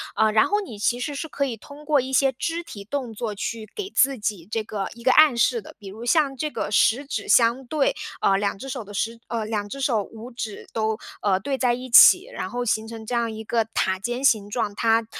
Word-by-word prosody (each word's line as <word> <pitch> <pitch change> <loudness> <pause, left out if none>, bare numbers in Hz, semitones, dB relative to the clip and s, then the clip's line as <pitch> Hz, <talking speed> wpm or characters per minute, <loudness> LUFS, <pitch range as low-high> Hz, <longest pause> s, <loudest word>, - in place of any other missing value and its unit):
呃 220 0 +3
然 215 0 +4
后 415 +1 +1
你 295 - -8
其 240 +3 +1
实 290 +4 -3
是 320 - -4
可 280 -2 -2
以 250 -4 -3
通 285 +6 -13
过 295 -1 +3
一 260 +1 -6
些 270 +1 +4
肢 335 +7 -3
体 205 -11 -9
动 250 +1 -4
作 220 0 -4
去 220 +2 -5
给 405 -2 -4
自 275 -7 +3
己 205 -5 -3
这 220 0 -2
个 205 -2 -4
一 235 - -14
个 260 - +4
暗 305 -2 +6
示 235 0 +2
的。 - - -14
比 200 - -11
如 215 +5 -8
像 285 0 +2
这 305 +3 -2
个 - - -3
食 235 +6 +3
指 225 -7 -4
相 235 +3 +4
对， 300 - 0 0.3
呃 195 - +3
2 200 0 -1
只 270 +7 -8
手 255 -3 -4
的 205 0 -12
10 230 +3 -2
呃 230 -2 -3
2 210 -2 -3
只 275 - -7
手 235 -6 +1
5 225 +4 -11
指 225 -4 -6
都 220 -1 -1 0.5
对 275 +1 -1
在 250 -2 +2
一 255 +1 -6
起， 235 - +8
然 185 - -5
后 245 +3 -3
形 220 -1 0
成 225 -1 -8
这 245 - -5
样 235 -1 0
一 220 0 -7
个 225 0 0
塔 190 0 +1
尖 240 +5 -3
形 215 -7 +3
状， 210 -1 -2
它 225 +1 +2
235 Hz, 250 characters per minute, -24 LUFS, 215-270 Hz, 0.5 s, 起